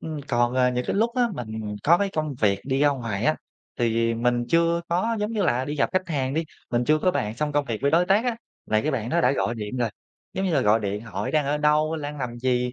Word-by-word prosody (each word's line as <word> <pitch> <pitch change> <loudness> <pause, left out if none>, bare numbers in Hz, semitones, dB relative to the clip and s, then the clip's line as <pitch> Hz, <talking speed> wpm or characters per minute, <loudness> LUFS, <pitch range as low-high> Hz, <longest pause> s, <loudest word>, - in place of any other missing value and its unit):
Ừm, 155 -2 -5
còn, 120 0 +1
ờ, 125 -1 +3
những 125 0 -2
cái - - -1
lúc 230 +3 +1
á 250 - +3
mình 110 -3 -5
có 170 +3 +5
cái 200 - +1
công 155 -3 -2
việc 100 -2 +2
đi 135 0 0
ra 145 - +5
ngoài 115 -7 -2
á, 155 - +3 0.4
thì 115 -1 +1
mình 120 +1 +1
chưa 170 0 +3
có, 205 +7 0
giống 210 - -1
như 215 -3 0
là, 130 -6 +1
đi 145 - -4
gặp 140 - +2
khách 185 -1 0
hàng 135 -3 -1
đi, 160 - 0 0.3
mình 120 0 +1
chưa 155 +3 +3
có 185 - +2
bàn 105 -9 -2
xong 150 +2 -1
công 145 0 +1
việc 115 -5 -4
với 140 - +3
đối 170 +3 +3
tác 200 +5 +3
á, 245 -2 0 0.3
là 110 - +2
cái 150 - -1
bạn 115 -6 -2
đó - - +2
đã 125 +2 +3
gọi 120 - -1
điện 105 +2 -5
rồi, 120 -3 0 0.4
giống 190 +1 -2
như 185 - 0
là, 140 - +3
gọi 105 0 +3
điện 100 0 -3
hỏi: 115 0 -4
"Đang 150 -2 +1
ở 145 +1 +1
đâu? 150 +1 +2
Lang 150 -1 -5
làm 120 -2 -4
gì?" 125 0 0
135 Hz, 280 wpm, -24 LUFS, 120-160 Hz, 0.4 s, có